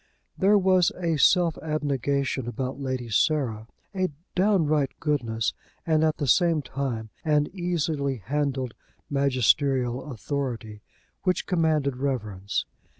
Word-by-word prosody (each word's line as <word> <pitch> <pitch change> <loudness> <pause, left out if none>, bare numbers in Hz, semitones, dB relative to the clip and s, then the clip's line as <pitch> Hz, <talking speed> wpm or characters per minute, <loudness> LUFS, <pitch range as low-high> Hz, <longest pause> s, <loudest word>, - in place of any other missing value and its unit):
There 205 +2 +4
was 185 -2 +4
a 170 -3 0
self 170 +2 +4
abnegation 140 -4 -1
about 130 +2 -4
Lady 130 -3 -3
Sarah, 115 -3 +1 0.3
a 185 -1 0 0.2
downright 160 -8 +2
goodness, 115 -7 0 0.3
and 160 -1 +3
at 155 -1 +2
the 145 - -1
same 165 +2 +3
time 120 -4 -4
an 150 -2 +3
easily 160 -6 -1
handled 130 +2 -2 0.4
magisterial 135 -1 +2
authority, 120 -5 -4 0.4
which 185 -1 0
commanded 155 -7 +1
reverence. 110 -8 -2
140 Hz, 110 wpm, -26 LUFS, 125-160 Hz, 0.4 s, There